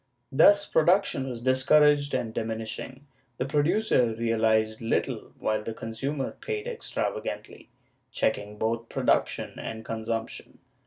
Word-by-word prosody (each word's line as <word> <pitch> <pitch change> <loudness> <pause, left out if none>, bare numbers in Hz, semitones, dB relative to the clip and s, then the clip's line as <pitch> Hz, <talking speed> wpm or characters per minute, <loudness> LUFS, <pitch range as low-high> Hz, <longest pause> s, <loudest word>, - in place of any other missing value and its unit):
Thus 200 +8 +6
production 160 -6 +2
was 120 -2 -6
discouraged 145 +3 +4
and 120 -3 -2
diminishing; 115 +5 -4 0.3
the 125 - -1
producer 145 - +2
realized 110 -1 +1
little, 115 - -1
while 110 0 -1
the 110 +1 -6
consumer 135 +6 -3
paid 435 -1 -5
extravagantly, 485 -1 -4 0.4
checking 105 +1 -1
both 115 +1 -2
production - - 0
and 110 0 -6
consumption. 115 0 -4
120 Hz, 110 wpm, -27 LUFS, 110-145 Hz, 0.4 s, Thus